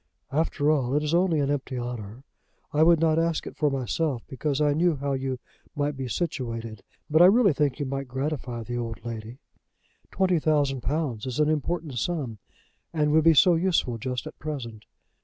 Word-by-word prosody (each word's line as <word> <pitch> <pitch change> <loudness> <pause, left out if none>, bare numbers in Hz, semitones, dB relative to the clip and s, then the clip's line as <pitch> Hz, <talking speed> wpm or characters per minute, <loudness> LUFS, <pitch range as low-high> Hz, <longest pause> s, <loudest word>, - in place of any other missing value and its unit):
"After 150 0 +1
all, 135 -3 +1
it 150 - +2
is 150 +1 -1
only 175 -2 +3
an 140 0 +1
empty 135 -2 -3
honour. 120 -1 -6 0.5
I 150 - +2
would 165 0 +6
not 160 0 +3
ask 165 -1 0
it - - -8
for 150 - +2
myself 135 0 -1
because 140 +1 -2
I 150 -1 +3
knew 165 +2 +2
how 140 0 -2
you 130 -1 -2 0.4
might 145 0 -1
be 135 -1 -4
situated. 115 - -3 0.3
But 155 +2 +4
I - - +10
really 200 -1 +5
think 145 -1 0
you 145 - -1
might 135 0 -4
gratify 130 -3 -3
the 120 +2 -4
old 115 0 -5
lady. 115 +1 -6 0.7
Twenty 185 -3 +2
thousand 145 -4 +1
pounds 135 -4 -2
is 130 +2 -3
an 150 0 +3
important 155 -3 -2
sum, 130 -7 -3 0.5
and 150 -2 +1
would 160 +1 +4
be 165 -1 +7
so 175 +6 +6
useful 165 -9 +1
just 125 +1 -3
at - - -10
present!" 120 -8 -6
145 Hz, 190 wpm, -26 LUFS, 125-155 Hz, 0.7 s, I